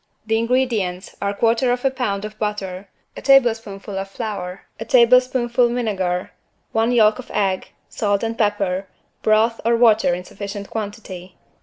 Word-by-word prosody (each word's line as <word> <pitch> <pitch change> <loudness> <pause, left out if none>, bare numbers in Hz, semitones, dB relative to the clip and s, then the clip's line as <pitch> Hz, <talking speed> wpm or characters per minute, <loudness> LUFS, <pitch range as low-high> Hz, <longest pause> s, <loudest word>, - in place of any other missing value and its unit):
The 225 0 +1
ingredients 230 -7 -1
are 200 - 0
1/4 235 +3 +2 0.2
lb. 210 -6 -2
of 215 0 -9
butter, 200 -3 -4 0.3
a - - -8
tablespoonful 225 -7 +2
of 195 0 -5
flour, 195 -4 -5 0.2
a 225 - -5
tablespoonful 245 0 +4
vinegar, 190 -7 -2 0.4
one 225 +2 +1
yolk 215 -1 +4
of 255 - -9
egg, 190 -2 -1 0.2
salt 205 -1 -1
and 225 0 -2
pepper, 200 -3 0 0.3
broth 220 +2 +2
or 235 +1 +3
water 220 -6 +4
in 180 - -6
sufficient 200 +1 -7
quantity. 200 -4 -6
215 Hz, 140 wpm, -21 LUFS, 195-235 Hz, 0.4 s, tablespoonful